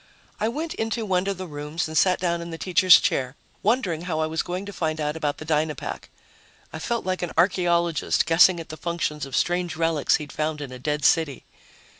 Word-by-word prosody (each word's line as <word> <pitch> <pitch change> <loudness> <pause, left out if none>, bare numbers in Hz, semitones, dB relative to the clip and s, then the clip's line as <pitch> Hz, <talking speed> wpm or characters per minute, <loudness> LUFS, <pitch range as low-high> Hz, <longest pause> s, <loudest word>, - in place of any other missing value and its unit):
I 215 - +1
went 315 +7 -4
into 225 0 -2
one 185 -1 0
of 200 -2 -1
the 185 - -5
rooms 150 0 -4
and 155 - -7
sat 180 +2 +3
down 170 -1 -1
in 170 - -7
the 165 - -6
teacher's 185 0 +6
chair, 130 0 -1 0.3
wondering 190 -7 0
how 160 -3 -2
I 155 - +2
was 160 +1 -1
going 180 +2 -4
to 205 - -8
find 160 -3 -2
out 150 0 -1
about 150 -3 -2
the 155 - -8
Dynapack. 155 -2 -2 0.6
I 160 - -5
felt 235 +7 -2
like 185 0 -1
an 175 - -3
archaeologist 170 -2 +2
guessing 170 +2 +5
at 165 - -8
the 155 - -7
functions 150 -3 -3
of 135 - -5
strange 175 -1 0
relics 165 -3 +2
he'd 150 -2 -5
found 155 0 -2
in 140 -3 -6
a 125 - -8
dead 150 +1 -2
city. 160 -5 +2
165 Hz, 215 wpm, -24 LUFS, 155-180 Hz, 0.6 s, teacher's